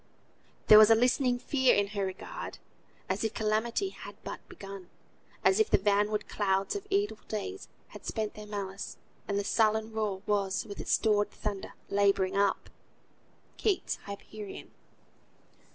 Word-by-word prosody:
"There 215 - +10
was 215 0 +8
a 225 - +8
listening 250 +1 +3
fear 260 0 +3
in 200 0 +1
her 200 -1 -2
regard, 190 - -5 0.5
As 190 +3 -1
if 220 0 -1
calamity 225 - 0
had - - -10
but - - -6
begun; 195 -2 -9 0.6
As 385 - +5
if 435 - +3
the - - +5
vanward 205 +1 +1
clouds 195 - 0
of 405 0 -5
evil 400 - 0
days 390 - -4 0.2
Had - - -11
spent 220 -2 -2
their 210 0 -10
malice, 200 -1 -5 0.3
and 200 - 0
the 200 - 0
sullen 220 +1 +2
rear 210 -3 -2
Was, 195 -2 0
with 200 -2 -8
its - - -7
stored 205 -2 +3
thunder, 205 -2 -5
labouring 195 -1 +2
up." 200 0 +1 0.9
KEATS' 410 -4 0
"HYPERION." 200 0 -8
210 Hz, 150 wpm, -30 LUFS, 200-225 Hz, 0.9 s, There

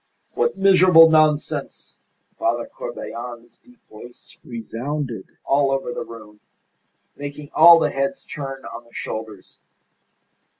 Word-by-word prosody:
"What 475 - 0
miserable 180 -4 +6
nonsense!" 155 -1 0 0.4
Father 340 0 0
Corbelan's 120 - -9
deep 250 -1 -25
voice 120 +3 -14
resounded 120 0 -6
all 140 0 +2
over 135 -3 -2
the - - -5
room, 105 -2 -13 0.8
making 145 +1 -8
all 170 -1 +8
the - - +1
heads 140 0 -3
turn 135 -2 -7
on 120 - -9
the 115 - -24
shoulders. 110 -3 -8
140 Hz, 115 wpm, -21 LUFS, 120-160 Hz, 0.8 s, all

